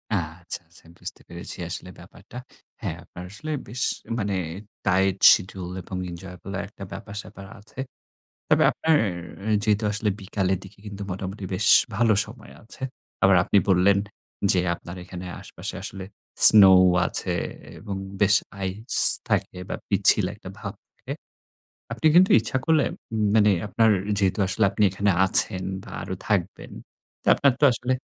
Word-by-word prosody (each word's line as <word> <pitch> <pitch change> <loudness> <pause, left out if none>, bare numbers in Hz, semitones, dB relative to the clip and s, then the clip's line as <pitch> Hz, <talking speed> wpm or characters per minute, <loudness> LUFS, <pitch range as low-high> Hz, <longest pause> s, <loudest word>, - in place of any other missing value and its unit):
আচ্ছা, 85 0 -4
আচ্ছা 85 +1 -18
বুঝতে - - -7
পেরেছি 85 0 -9
আসলে 90 +1 -7
ব্যাপারটা। 125 - -15 0.4
হ্যাঁ, 80 - -5
আপনার 90 +1 -12
আসলে 155 +9 -8 0.2
বেশ 125 +4 -7 0.4
মানে 100 -2 -3 0.5
টাইট 95 0 +1 0.2
শিডিউল 95 -2 -4
এবং 95 - -8
enjoyable 90 +2 -10
একটা 100 - -13
ব্যাপার-স্যাপার 100 0 -10
আছে। 105 +5 -16 0.7
তবে - - +3
আপনার 160 0 0 0.7
যেহেতু 105 0 0
আসলে 105 +1 -2
বিকালের 95 -1 -2
দিকে 95 +1 -15
কিন্তু 100 0 -9
মোটামুটি 95 +2 -7
বেশ 100 +2 -1 0.3
ভালো 115 0 +2
সময় 110 +1 -15
আছে। 115 - -15 0.4
আবার 95 0 +5
আপনি - - +1
বললেন, 95 +2 +3 0.5
যে 95 - +1 0.2
আপনার 85 +1 -11
এখানে 90 0 -10 0.2
আশেপাশে - - -8
আসলে 95 -1 -8 0.4
স্নো 105 -3 +10 0.4
আছে - - -2 0.4
এবং 100 -1 -7 0.3
বেশ 105 0 +4 0.3
আইস 100 +6 -4 0.3
থাকে - - -2
বা - - -3
পিচ্ছিল - - +3
একটা - - -12
ভাব - - -7 0.2
থাকে। - - -13 0.8
আপনি 160 - 0
কিন্তু 185 +2 +5
ইচ্ছা 120 - -3
করলে 160 -3 +2 0.5
মানে 105 -1 +4 0.2
আপনার 110 +2 +1 0.3
যেহেতু 100 +1 0
আসলে 95 +4 -1
আপনি 105 - -1
এখানে 100 +2 -2 0.2
আছেন 95 -1 +3 0.2
বা - - -13
আরও - - -6
থাকবেন। - - -3 0.6
আপনার 140 -2 +2
তো - - -3
আসলে 125 +2 -2
100 Hz, 140 wpm, -23 LUFS, 95-110 Hz, 0.8 s, স্নো